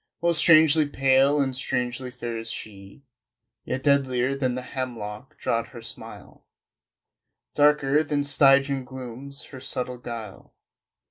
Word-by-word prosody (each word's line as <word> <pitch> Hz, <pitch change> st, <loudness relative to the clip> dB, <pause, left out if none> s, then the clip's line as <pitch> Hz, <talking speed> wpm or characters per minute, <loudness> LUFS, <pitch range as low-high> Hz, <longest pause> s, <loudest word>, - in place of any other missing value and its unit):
Most 170 Hz, -2 st, +2 dB
strangely 155 Hz, -2 st, +6 dB
pale 135 Hz, +1 st, +3 dB
and 135 Hz, -2 st, 0 dB
strangely 125 Hz, 0 st, -2 dB
fair 120 Hz, -2 st, -6 dB
is 115 Hz, 0 st, -5 dB
she 100 Hz, +4 st, -8 dB, 0.6 s
Yet 130 Hz, -, -4 dB
deadlier 135 Hz, -2 st, +1 dB
than 130 Hz, -3 st, -1 dB
the 130 Hz, -, -5 dB
hemlock 120 Hz, -3 st, -7 dB
draught 115 Hz, 0 st, -1 dB
her 120 Hz, -, -11 dB
smile, -, -, -9 dB, 1.1 s
Darker 150 Hz, 0 st, +3 dB
than 145 Hz, -1 st, -1 dB
Stygian 140 Hz, -1 st, +3 dB
glooms 130 Hz, +2 st, -9 dB
her 135 Hz, -, -10 dB
subtle 125 Hz, -1 st, -4 dB
guile.... 115 Hz, -4 st, -9 dB
130 Hz, 125 wpm, -25 LUFS, 120-140 Hz, 1.1 s, strangely